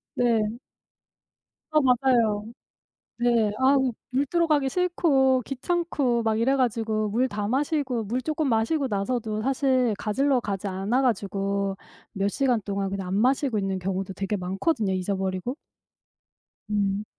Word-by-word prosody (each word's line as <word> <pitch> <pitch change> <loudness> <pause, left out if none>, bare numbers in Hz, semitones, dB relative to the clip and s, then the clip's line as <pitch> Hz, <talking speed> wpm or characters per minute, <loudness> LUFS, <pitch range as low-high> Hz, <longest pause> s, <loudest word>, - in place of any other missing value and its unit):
네. 240 -2 +3 1.3
아 310 - +3
맞아요. 245 -5 +2 0.7
네. 235 -3 +2
아 265 +2 +4 0.3
물 265 +3 +1
뜨러 340 +4 +1
가기 290 -4 +2
싫고 275 -7 +2
귀찮고 275 -4 0
막 220 -1 +1
이래 265 +4 +2
가지고 225 -4 0
물 245 +5 +1
다 205 -2 -3
마시고 265 -1 0
물 240 +5 -2
쪼끔 310 0 -1
마시고 255 +6 +1
나서도 215 0 -2
사실 260 -2 +2
가지러 270 +5 +1
가지 200 -2 -4
않아 195 +7 0
가지고 200 -4 -1 0.4
몇 195 0 0
시간 250 +1 +1
동안 195 -1 -2
그냥 195 -1 -4
안 185 - -2
마시고 255 +2 +2
있는 195 -1 -1
경우도 190 +1 -3
되게 195 +2 -2
많거든요 195 - -1
잊어버리고. 190 +5 -2 1.1
음 200 0 0
230 Hz, 270 characters per minute, -25 LUFS, 200-265 Hz, 1.3 s, 아